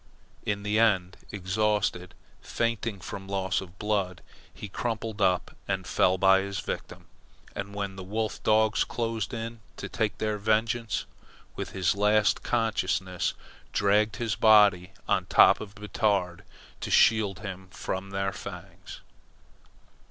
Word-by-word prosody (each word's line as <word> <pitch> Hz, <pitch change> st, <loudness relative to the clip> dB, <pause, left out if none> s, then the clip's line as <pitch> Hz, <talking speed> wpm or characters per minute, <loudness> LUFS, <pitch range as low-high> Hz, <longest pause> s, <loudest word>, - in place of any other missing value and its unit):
In 100 Hz, -1 st, -1 dB
the 105 Hz, +1 st, +1 dB
end, 95 Hz, -5 st, +2 dB, 0.2 s
exhausted, 95 Hz, -2 st, -1 dB, 0.3 s
fainting 115 Hz, -3 st, -2 dB
from 95 Hz, -1 st, -7 dB
loss 95 Hz, 0 st, -1 dB
of 95 Hz, 0 st, -12 dB
blood, 100 Hz, -4 st, -1 dB, 0.3 s
he 105 Hz, -, -8 dB
crumpled 110 Hz, 0 st, -4 dB
up 90 Hz, -2 st, +1 dB
and 95 Hz, -2 st, -2 dB
fell 95 Hz, +1 st, +2 dB
by 95 Hz, +1 st, +5 dB
his 100 Hz, 0 st, -4 dB
victim, -, -, -6 dB, 0.5 s
and 100 Hz, 0 st, -5 dB
when 100 Hz, -1 st, -4 dB
the 95 Hz, -, -6 dB
wolf 110 Hz, +3 st, -3 dB
dogs 110 Hz, 0 st, +3 dB
closed 115 Hz, -3 st, -3 dB
in 115 Hz, -1 st, -5 dB, 0.2 s
to -, -, -5 dB
take 110 Hz, -3 st, -1 dB
their 105 Hz, -1 st, -1 dB
vengeance, 110 Hz, +1 st, 0 dB, 0.5 s
with -, -, -5 dB
his 95 Hz, -1 st, +2 dB
last 105 Hz, +1 st, +3 dB
consciousness 95 Hz, -5 st, 0 dB, 0.4 s
dragged 105 Hz, 0 st, +2 dB
his 115 Hz, -2 st, -1 dB
body 100 Hz, -4 st, +5 dB, 0.2 s
on -, -, +1 dB
top -, -, +6 dB
of 100 Hz, -2 st, -9 dB
Batard 100 Hz, -3 st, -1 dB, 0.3 s
to -, -, -5 dB
shield 105 Hz, -3 st, +4 dB
him 95 Hz, -3 st, -7 dB
from 95 Hz, +1 st, -5 dB
their 95 Hz, 0 st, -1 dB
fangs. -, -, -9 dB
100 Hz, 135 wpm, -28 LUFS, 95-110 Hz, 0.5 s, top